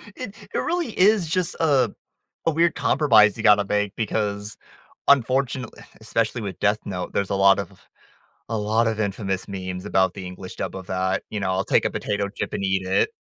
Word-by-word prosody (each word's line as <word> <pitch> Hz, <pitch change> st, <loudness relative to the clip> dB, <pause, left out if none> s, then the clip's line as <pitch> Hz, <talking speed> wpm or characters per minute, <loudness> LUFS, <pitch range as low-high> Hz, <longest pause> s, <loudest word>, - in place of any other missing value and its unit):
It 225 Hz, -5 st, -7 dB, 0.2 s
it -, -, -1 dB
really 340 Hz, -9 st, -2 dB
is 195 Hz, -2 st, +4 dB
just 175 Hz, +1 st, -1 dB
a 135 Hz, -8 st, +3 dB, 0.5 s
a 165 Hz, -, +3 dB
weird 165 Hz, +2 st, +2 dB
compromise 110 Hz, -9 st, +4 dB
you 110 Hz, -, -5 dB
gotta 105 Hz, -1 st, +5 dB
make 105 Hz, 0 st, -1 dB
because, 105 Hz, -2 st, -2 dB, 0.5 s
unfortunate 130 Hz, -2 st, +2 dB
eh, -, -, -13 dB, 0.2 s
especially 115 Hz, +1 st, -1 dB
with 100 Hz, -4 st, -6 dB
Death 105 Hz, +1 st, +2 dB
Note, 90 Hz, -3 st, -5 dB
there's 100 Hz, -1 st, 0 dB
a -, -, 0 dB
lot 100 Hz, 0 st, +5 dB
of 100 Hz, -, -7 dB, 0.7 s
a 115 Hz, -, -1 dB
lot 110 Hz, +2 st, +1 dB
of 110 Hz, -1 st, -1 dB
infamous 100 Hz, -2 st, -2 dB
memes 95 Hz, -1 st, -5 dB
about 95 Hz, -2 st, +2 dB
the 95 Hz, -2 st, -8 dB
English 90 Hz, 0 st, -8 dB
dub -, -, -4 dB
of 95 Hz, -2 st, -8 dB
that. 95 Hz, 0 st, -1 dB
You 105 Hz, -, -3 dB
know, 95 Hz, -1 st, -1 dB
I'll 95 Hz, +1 st, 0 dB
take -, -, +2 dB
a -, -, +2 dB
potato 100 Hz, -1 st, -2 dB
chip 100 Hz, -, -5 dB
and -, -, -3 dB
eat 95 Hz, -1 st, 0 dB
it. 95 Hz, -, +2 dB
105 Hz, 200 wpm, -23 LUFS, 95-120 Hz, 0.7 s, gotta